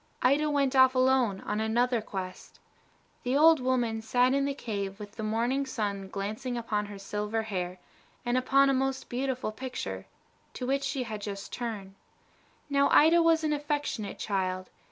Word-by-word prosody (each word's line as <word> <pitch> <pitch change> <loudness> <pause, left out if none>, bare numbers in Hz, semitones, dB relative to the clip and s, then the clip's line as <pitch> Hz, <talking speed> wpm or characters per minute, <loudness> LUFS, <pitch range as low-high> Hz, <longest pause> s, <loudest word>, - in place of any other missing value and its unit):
Ida 285 +4 +3
went 280 -2 +1
off 260 0 +6
alone 255 -6 +3
on 210 +1 -2
another 235 +2 +1
quest. 190 -3 -7 0.6
The 250 +2 0
old 320 +1 +7
woman 245 -3 0
sat 250 +3 +2
in 275 0 +2
the 280 0 -2
cave 200 -5 -4
with 205 -1 -8
the 220 - -8
morning 235 +5 0
sun 200 -5 -3
glancing 215 +6 -4
upon 210 -3 -2
her 205 -1 -8
silver 210 +3 -3
hair, 185 -4 -3 0.5
and 240 0 +1
upon 275 +2 +4
a - - +2
most 265 0 -1
beautiful 255 -2 -2
picture, 255 +3 -6 0.5
to 250 - -4
which 275 +2 +1
she 275 -1 -1
had 215 -3 -6
just 200 -1 -6
turned. 215 -5 -5 0.7
Now, 280 -1 +3
Ida 330 +3 +6
was 330 -1 +3
an 305 -1 +1
affectionate 290 -7 -2
child. 185 -2 -2
245 Hz, 165 wpm, -29 LUFS, 210-270 Hz, 0.7 s, old